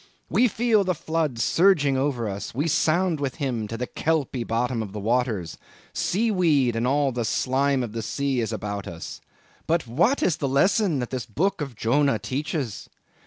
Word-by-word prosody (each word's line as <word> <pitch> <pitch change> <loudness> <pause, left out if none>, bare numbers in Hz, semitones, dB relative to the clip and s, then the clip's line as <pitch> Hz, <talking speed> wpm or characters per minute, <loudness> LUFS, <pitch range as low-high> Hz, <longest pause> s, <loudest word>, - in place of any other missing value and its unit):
We 250 - +4
feel 225 -2 +2
the 185 -1 0
floods 155 -8 -1
surging 160 - +3
over 130 -4 0
us; 100 +2 -5
we 145 +5 0
sound 165 +2 +2
with 135 -3 -2
him 125 -8 -2
to 115 - -5
the 125 - -2
kelpy 140 -4 -1
bottom 115 +1 -1
of 100 -3 -6
the 105 - -4
waters; 110 - -1 0.3
sea 220 +5 0
weed 150 - +2
and 115 +2 0
all 140 +1 +2
the 120 -1 -2
slime 135 +3 +1
of 115 - -5
the 115 +1 -4
sea 135 +3 -1
is 110 -2 -1
about 100 -2 -4
us! 85 -1 -8 0.5
But 165 -2 +1
what 170 - +2
is 175 - +2
this 140 - -1
lesson 175 +5 +2
that 120 - -5
the 130 -2 -2
book 195 +2 +1
of 135 -5 -5
Jonah 135 +3 +2
teaches? 130 - -4
135 Hz, 185 wpm, -25 LUFS, 115-160 Hz, 0.5 s, We